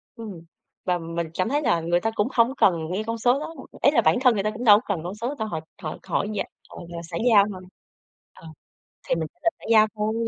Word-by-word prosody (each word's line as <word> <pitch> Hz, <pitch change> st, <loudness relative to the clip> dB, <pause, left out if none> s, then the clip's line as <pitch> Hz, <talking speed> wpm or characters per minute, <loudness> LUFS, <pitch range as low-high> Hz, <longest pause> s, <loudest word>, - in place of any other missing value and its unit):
Ừm. 210 Hz, -8 st, -8 dB, 0.4 s
Và 180 Hz, -1 st, +1 dB
mình 165 Hz, -1 st, -4 dB
cảm 185 Hz, +6 st, -1 dB
thấy 290 Hz, +2 st, +1 dB
là 175 Hz, -, +2 dB
người 175 Hz, +1 st, +1 dB
ta 225 Hz, -, 0 dB
cũng 205 Hz, +3 st, +1 dB
hổng 240 Hz, +3 st, +3 dB
cần 185 Hz, -, +5 dB, 0.2 s
nghe 205 Hz, +4 st, -1 dB
con 230 Hz, 0 st, -2 dB
số 245 Hz, +4 st, +2 dB
đó. 320 Hz, +2 st, -7 dB, 0.3 s
Ý 280 Hz, -, +5 dB
là 240 Hz, -6 st, +4 dB
bản -, -, +3 dB
thân 250 Hz, -3 st, +5 dB
người 200 Hz, -2 st, -1 dB
ta 215 Hz, -, 0 dB
cũng 235 Hz, +3 st, -7 dB
đâu 210 Hz, -3 st, +8 dB
có -, -, -13 dB
cần 160 Hz, -, -7 dB
con 180 Hz, +4 st, -5 dB
số 240 Hz, +6 st, -3 dB
đâu, 220 Hz, -, -1 dB
họ 160 Hz, -5 st, -3 dB, 0.2 s
họ 155 Hz, -1 st, -5 dB
hỏi -, -, 0 dB
vậy, -, -, -2 dB, 0.2 s
ờ, -, -, -12 dB
rồi 170 Hz, 0 st, -6 dB
xã 170 Hz, 0 st, -6 dB
giao 205 Hz, -3 st, +7 dB
thôi. 185 Hz, -1 st, -8 dB, 0.7 s
Ờ, 165 Hz, -, -14 dB, 0.6 s
thì -, -, +3 dB
mình 160 Hz, -2 st, -3 dB
trả -, -, -38 dB
lời 335 Hz, -, +3 dB
xã -, -, -16 dB
giao 215 Hz, -1 st, +7 dB
thôi. 215 Hz, +1 st, -1 dB
210 Hz, 265 wpm, -24 LUFS, 175-230 Hz, 0.7 s, đâu